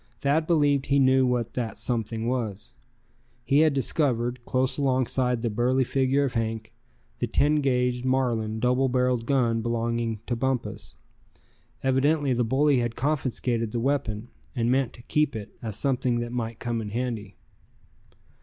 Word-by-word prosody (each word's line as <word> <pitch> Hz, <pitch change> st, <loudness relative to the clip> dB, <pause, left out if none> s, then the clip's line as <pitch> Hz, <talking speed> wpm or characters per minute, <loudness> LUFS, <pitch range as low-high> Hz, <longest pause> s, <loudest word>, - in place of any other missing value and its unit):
Thad 150 Hz, +3 st, +1 dB
believed 145 Hz, -5 st, +2 dB
he 140 Hz, -, +3 dB
knew 130 Hz, -1 st, +4 dB
what 120 Hz, -2 st, -1 dB
that 115 Hz, -4 st, -3 dB
something 115 Hz, -1 st, -1 dB
was. 110 Hz, -4 st, -3 dB, 0.7 s
He 140 Hz, +1 st, +3 dB
had 155 Hz, 0 st, +5 dB
discovered, 125 Hz, -3 st, 0 dB
close 130 Hz, +2 st, 0 dB
alongside 130 Hz, -2 st, +1 dB
the 120 Hz, -, +1 dB
burly 125 Hz, +4 st, +2 dB
figure 135 Hz, +2 st, +1 dB
of 135 Hz, -2 st, -1 dB
Hank, 110 Hz, -1 st, -3 dB, 0.5 s
the -, -, 0 dB
ten 150 Hz, +1 st, +2 dB
guaged, 125 Hz, -2 st, +1 dB
Marlin, 120 Hz, -4 st, 0 dB
double 125 Hz, +2 st, +2 dB
barreled 125 Hz, -2 st, +1 dB
gun 120 Hz, -4 st, +2 dB
belonging 115 Hz, -1 st, -1 dB
to 120 Hz, -, -1 dB
Bumpus. 115 Hz, -4 st, -3 dB, 0.9 s
Evidently 135 Hz, +1 st, +2 dB
the 120 Hz, 0 st, +1 dB
bully 135 Hz, +3 st, +3 dB
had 120 Hz, -1 st, -2 dB
confiscated 125 Hz, -5 st, -1 dB
the 120 Hz, -, 0 dB
weapon, 120 Hz, -4 st, -1 dB, 0.3 s
and 120 Hz, -1 st, +1 dB
meant 130 Hz, -2 st, +1 dB
to 120 Hz, -, -13 dB
keep 150 Hz, +1 st, 0 dB
it, 105 Hz, -2 st, -7 dB
as 110 Hz, -4 st, -4 dB
something 125 Hz, -3 st, 0 dB
that 120 Hz, 0 st, -4 dB
might 115 Hz, -2 st, -3 dB
come 120 Hz, -2 st, -2 dB
in 105 Hz, -, -5 dB
handy. 110 Hz, -3 st, -4 dB
125 Hz, 155 wpm, -26 LUFS, 115-135 Hz, 0.9 s, had